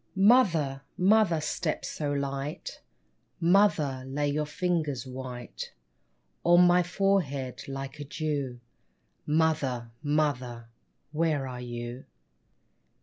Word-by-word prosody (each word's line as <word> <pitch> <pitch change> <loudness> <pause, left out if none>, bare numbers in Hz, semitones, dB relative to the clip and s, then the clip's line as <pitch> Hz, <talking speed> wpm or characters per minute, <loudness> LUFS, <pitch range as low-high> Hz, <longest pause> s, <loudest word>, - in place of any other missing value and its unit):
Mother, 190 - +4 0.2
mother, 190 -3 +4
step 155 +1 -2
so 145 -2 -3
light, 140 +1 -4 0.6
Mother, 165 -7 +3
lay 145 +2 -1
your 150 +1 -1
fingers 155 -6 -1
white 125 -2 -7 0.7
On 175 +1 +7
my 175 0 +5
forehead 175 -8 0
like 135 +1 -6
a - - -4
dew! 140 -4 -3 0.7
Mother, 150 -7 +1 0.2
mother, 130 -6 0 0.4
where 155 -3 0
are 125 -1 -6
you 120 +1 -6
145 Hz, 95 wpm, -28 LUFS, 130-170 Hz, 0.7 s, On